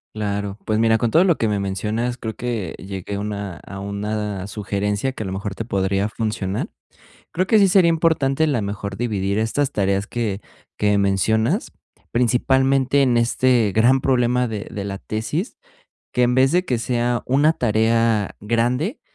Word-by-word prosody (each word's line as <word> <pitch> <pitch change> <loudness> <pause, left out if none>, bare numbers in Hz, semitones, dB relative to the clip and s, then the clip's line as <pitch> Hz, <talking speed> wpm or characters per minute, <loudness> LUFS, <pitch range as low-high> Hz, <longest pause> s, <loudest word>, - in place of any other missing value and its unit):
Claro. 100 -1 -3
Pues 110 - 0
mira, 110 0 +4
con 120 - 0
todo 165 +10 +5
lo 175 -4 +3
que 115 - 0
me 105 -1 0
mencionas, 110 +6 -2
creo 110 -1 -5
que 115 -7 -3
llegué 95 0 -5
a - - -3
una 100 -3 -4
a 95 0 -8
una 100 -1 -3
sugerencia 105 +4 -2
que 110 - -5
a - - -7
lo 95 - -4
mejor 100 +1 -4
te - - -4
podría 100 -1 0
funcionar. 105 -3 -3 0.6
Creo 185 +3 0
que 215 +2 +4
sí 195 - +6
sería 185 -3 +5
importante 160 -3 +2
la 125 -7 0
mejor 100 -1 -5
dividir 100 -4 -1
estas 130 +6 0
tareas 100 -2 0
que 105 -4 -3 0.3
que 105 -1 +2
mencionas, 110 - +1 0.4
principalmente 130 +3 +2
en 125 -3 +3
este 120 -2 +2
gran 125 +4 +4
problema 125 -1 +2
de 105 -2 -5
de 100 - -4
la 100 -1 -4
tesis 130 - -3 0.6
que 125 - +2
en 125 +1 +2
vez 135 +2 +4
de 180 +1 +2
que 125 -9 -1
sea 120 0 0
una 145 +5 +4
tarea 115 -4 +1
grande, 120 - 0
110 Hz, 170 wpm, -21 LUFS, 100-130 Hz, 0.6 s, sí